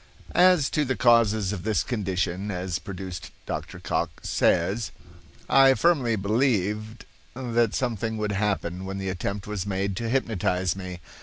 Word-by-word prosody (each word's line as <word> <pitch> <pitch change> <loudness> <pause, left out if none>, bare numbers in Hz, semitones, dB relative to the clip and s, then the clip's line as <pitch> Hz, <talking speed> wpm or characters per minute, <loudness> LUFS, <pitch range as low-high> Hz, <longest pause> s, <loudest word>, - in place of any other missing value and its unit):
As 180 -5 +5
to 150 - +2
the 130 -2 -1
causes 110 -4 +3
of 95 - -4
this 110 +2 +1
condition 95 -4 -2
as 90 -2 -2
produced 95 0 -7 0.2
Dr. - - -5
Cocke - - -3
says: 95 +6 +1 0.6
"I 135 -1 +6
firmly 135 -10 +2
believed 110 0 0 0.3
that 120 -3 0
something 115 -3 -1
would 105 -1 -1
happen 95 -3 -1
when 95 0 -4
the 95 -1 -3
attempt 100 +2 -3
was 105 -2 -4
made 100 0 -1
to 115 0 -2
hypnotize 95 -8 0
me. 90 -2 -7
105 Hz, 145 wpm, -26 LUFS, 95-120 Hz, 0.6 s, I